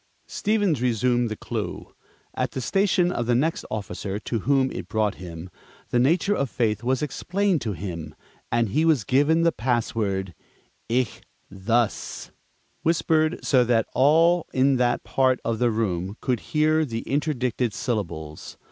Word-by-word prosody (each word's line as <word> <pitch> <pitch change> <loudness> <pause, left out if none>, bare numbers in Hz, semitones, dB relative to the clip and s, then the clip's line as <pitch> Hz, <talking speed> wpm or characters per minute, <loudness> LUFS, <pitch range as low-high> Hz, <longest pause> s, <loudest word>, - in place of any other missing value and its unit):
Stevens 205 - 0
resumed 120 0 +1
the 110 - -3
Clue. - - -5 0.4
At - - -2
the - - -3
station 185 +4 +2
of 120 -8 -2
the 120 - +3
next 155 +7 0
officer 100 -1 -4
to 115 +2 -3
whom 135 +3 +2
it 85 - -6
brought 105 0 0
him, 85 0 -8 0.4
the 120 - +3
nature 170 +10 +3
of 140 -8 -1
faith 110 -4 0
was 130 +3 0
explained 185 +2 0
to 110 -3 -2
him, 85 -4 -6 0.4
and 115 -2 +1
he 150 +9 +1
was 155 -8 +3
given 145 - +3
the 170 - +4
password, 110 - -1 0.6
"Ichthus," 115 -2 -2 0.5
whispered 160 0 +1
so 130 -3 +4
that 115 -2 +2
all 165 +5 +4
in 135 +1 +3
that 120 -1 +1
part 130 -1 +2
of 115 -1 -1
the 120 - +3
room 100 -3 -2
could 125 -4 -1
hear 155 +1 +3
the 115 -6 -3
interdicted 130 -5 -1
syllables. 85 - -4
125 Hz, 145 wpm, -24 LUFS, 110-150 Hz, 0.6 s, the